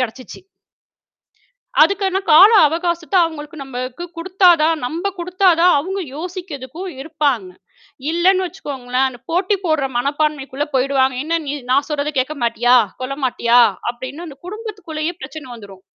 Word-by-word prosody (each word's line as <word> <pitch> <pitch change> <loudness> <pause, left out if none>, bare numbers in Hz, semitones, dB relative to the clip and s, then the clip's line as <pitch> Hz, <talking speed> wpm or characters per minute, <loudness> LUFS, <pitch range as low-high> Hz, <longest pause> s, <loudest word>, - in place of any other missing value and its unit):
கெடைச்சுச்சு. 255 +1 -5 1.4
அதுக்கானா 385 -1 +2
கால 375 +8 +9 0.2
அவகாசத்தை 340 +3 -1
அவுங்களுக்கு 315 -1 -8
நம்மக்கு 255 +4 -6
குடுத்தாதான், 340 -3 +3
நம்ப 335 +8 -3
குடுத்தாதான் 360 -1 +3
அவுங்க 380 +6 -3 0.2
யோசிக்கிறதுக்கும் 350 -1 -7
இருப்பாங்க. 285 - -1 0.6
இல்லன்னு 370 +3 +3
வச்சுக்கோங்களேன், 265 -5 -2
அந்தப் 245 -2 -11
போட்டி 375 +4 +1
போடுற 315 -5 +1
மனப்பான்மைக்குள்ள 285 +1 -1
போயிடுவாங்க. 265 0 +2
"என்னா 330 +2 0
நீ! 280 - -2 0.2
நான் 280 +2 +2
சொல்றதை 300 0 -2
கேட்க 280 +4 -2
மாட்டியா? 240 +1 +3 0.3
கொள்ள 265 +2 -3
மாட்டியா?" 240 -1 +3 0.3
அப்டின்னு 260 +7 -8
அந்தக் 280 +2 -13
குடும்பத்துக்குள்ளேயே 375 -6 -5
பிரச்சனை 275 +1 -8
வந்துரும். 200 -4 -13
305 Hz, 120 wpm, -19 LUFS, 265-350 Hz, 1.4 s, கால